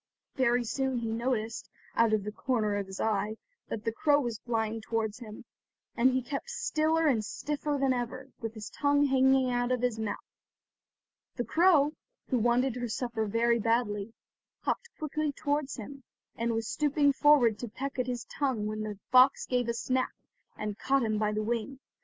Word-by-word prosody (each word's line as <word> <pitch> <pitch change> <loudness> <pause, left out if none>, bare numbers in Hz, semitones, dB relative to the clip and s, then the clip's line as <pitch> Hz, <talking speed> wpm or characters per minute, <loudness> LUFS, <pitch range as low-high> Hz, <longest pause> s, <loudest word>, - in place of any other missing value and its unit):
Very 245 -2 +2
soon 265 +2 -1
he 230 -1 -2
noticed, 230 -1 -2 0.3
out 230 -1 +4
of 215 -2 +2
the 210 - -4
corner 215 -2 0
of 200 -1 -2
his 190 0 -8
eye, 215 0 0 0.3
that 220 +1 -5
the 225 - +1
crow 290 +5 +3
was 240 -5 -3
flying 225 -2 -2
towards 220 0 -2
him, 215 -3 -10 0.5
and 250 +2 +5
he 260 0 0
kept 280 - -5
stiller 325 -9 +1
and 245 -8 +3
stiffer 295 +6 -2
than 270 -1 +3
ever, 255 +2 -4
with 225 -1 -5
his 215 -1 -7
tongue 285 0 +2
hanging 265 -1 +4
out 245 0 0
of 250 -1 0
his 240 -3 0
mouth. 215 -2 -2 1.2
The 245 - -1
crow, 320 -4 +4 0.4
who 255 - +2
wanted 245 +2 +2
her 245 -1 -2
supper 225 -1 -2
very 235 +2 +2
badly, 225 -2 0 0.5
hopped 475 - -2
quickly 305 -1 -2
towards 290 -1 -1
him, 275 +5 -8 0.3
and 230 0 -1
was 225 0 -2
stooping 290 -1 +2
forward 265 -7 +5
to 245 - -4
peck 265 +4 -5
at 250 - 0
his 245 -2 -3
tongue 260 -7 -1
when 215 0 -3
the 210 -1 -4
fox 255 +2 +6
gave 250 -2 0
a - - +1
snap, 255 +2 -1 0.4
and 210 -1 -4
caught 270 -1 +2
him 215 -2 0
by 210 -1 +1
the 215 0 -1
wing. 235 +4 -2
245 Hz, 180 wpm, -30 LUFS, 220-270 Hz, 1.2 s, fox